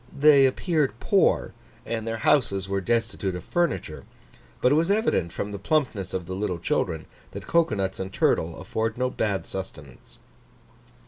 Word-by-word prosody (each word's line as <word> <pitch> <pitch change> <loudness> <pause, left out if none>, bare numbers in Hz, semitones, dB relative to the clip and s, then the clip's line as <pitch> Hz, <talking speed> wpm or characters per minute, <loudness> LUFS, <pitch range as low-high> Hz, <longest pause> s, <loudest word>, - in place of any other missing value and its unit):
They 140 -2 +7
appeared 155 +1 0
poor, - - +2 0.3
and 115 -1 -3
their 115 0 -2
houses 100 -5 +2
were 100 0 -1
destitute 115 -3 -1
of 90 - -6
furniture; 175 - -1 0.6
but 125 - +3
it - - +5
was 165 +4 +2
evident, 200 - +1
from 105 - -4
the 100 - -5
plumpness 110 - 0
of 90 -2 -3
the 95 - -6
little 95 -2 -2
children, 80 -1 -1 0.3
that - - -7
cocoa 170 -9 +2
nuts 95 -1 -2
and 95 0 -4
turtle 80 -3 +1
afford 110 +5 -2
no 125 0 0
bad 100 -5 -1
sustenance. 75 -9 -9
110 Hz, 165 wpm, -25 LUFS, 95-135 Hz, 0.6 s, They